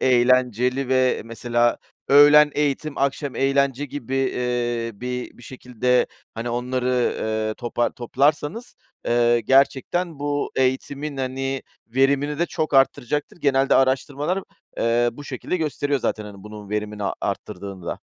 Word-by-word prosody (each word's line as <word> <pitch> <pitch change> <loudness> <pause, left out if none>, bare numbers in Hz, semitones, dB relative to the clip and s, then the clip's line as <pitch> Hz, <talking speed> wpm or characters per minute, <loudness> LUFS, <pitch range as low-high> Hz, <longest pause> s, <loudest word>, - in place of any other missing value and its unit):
eğlenceli; 125 +1 +2
ve 130 -3 +2
mesela 120 +1 0 0.3
öğlen 145 +1 +7
eğitim, 150 0 -1
akşam 140 0 -1
eğlence 140 0 +1
gibi, 135 -2 -6
eee, 120 -3 -1
bir 125 +3 -5
bir - - -14
şekilde, 125 0 0 0.3
hani, 115 +1 -4
onları, 125 +1 -1 0.3
eee, 110 0 -2
topa 120 0 -1
toplarsanız, 145 - -1 0.3
eee, 120 0 +3
gerçekten 140 +6 +2
bu 145 0 -2
eğitimin, 140 +3 -1
hani, 135 0 -3 0.2
verimini 140 +4 +1
de 175 - +1
çok 155 -3 -2
arttıracaktır. 135 +2 +1
Genelde 135 -3 +2
araştırmalar, 140 +7 +1 0.4
eee, 120 +1 +2
bu 145 +4 -11
şekilde 135 +6 -3
gösteriyor 145 -3 -1
zaten, 110 - -2
hani, 100 -2 -11
bunun 105 -1 -10
verimini 105 0 -3 0.2
arttırdığını 95 -3 -5
da. - - -3
130 Hz, 125 wpm, -23 LUFS, 120-140 Hz, 0.4 s, öğlen